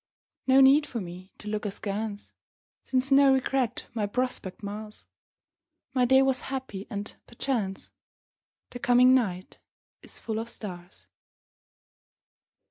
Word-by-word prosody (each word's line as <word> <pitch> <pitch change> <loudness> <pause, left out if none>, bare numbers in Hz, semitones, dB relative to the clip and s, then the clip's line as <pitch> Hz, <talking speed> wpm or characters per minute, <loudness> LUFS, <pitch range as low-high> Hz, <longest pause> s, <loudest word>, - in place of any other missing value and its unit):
No 265 +1 +6
need 280 +3 +6
for 235 - -4
me 185 0 -9
to 210 - -11
look 210 0 -2
askance, 205 +1 -4 0.5
Since 260 +1 -1
no 275 0 +7
regret 265 -2 0
my 215 -3 -1
prospect 215 -4 -2
mars. 210 +1 -7 0.9
My 255 -2 +3
day 265 +2 +5
was 265 -1 +2
happy 260 -7 -5
and 205 0 -6
perchance 230 -6 -3 0.8
The 245 - -7
coming 250 +1 +5
night 190 -8 0 0.4
is - - -7
full 220 -1 -3
of 230 +1 -5
stars. 180 -5 -8
230 Hz, 125 wpm, -27 LUFS, 205-260 Hz, 0.9 s, no